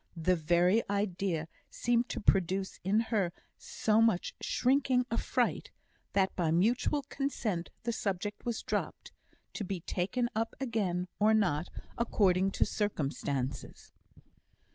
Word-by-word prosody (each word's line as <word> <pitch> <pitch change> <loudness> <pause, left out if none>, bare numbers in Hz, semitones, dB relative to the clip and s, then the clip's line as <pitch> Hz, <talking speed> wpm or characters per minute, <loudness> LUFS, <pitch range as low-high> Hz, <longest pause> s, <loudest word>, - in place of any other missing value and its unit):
The 180 +3 +2
very 175 +6 +3
idea 190 -5 -1 0.2
seemed 240 0 +1
to - - -3
produce 190 -1 +1
in 200 +4 +3
her 195 -5 +2 0.3
so 220 0 +1
much 225 -6 +2
shrinking 255 -1 +2
affright, 230 - 0 0.4
that 195 -1 +2
by 170 -3 +1
mutual 235 - +2
consent 255 -10 -2
the 235 - 0
subject 205 0 -3
was 235 -2 -3
dropped; - - -3 0.4
to - - -4
be 185 -2 -4
taken 205 +9 -1
up 225 +1 -1
again, 200 -9 -1
or 215 +1 +5
not, 175 -6 +1 0.3
according 195 -5 +3
to - - +2
circumstances. 140 - -3
200 Hz, 120 wpm, -31 LUFS, 175-225 Hz, 0.4 s, or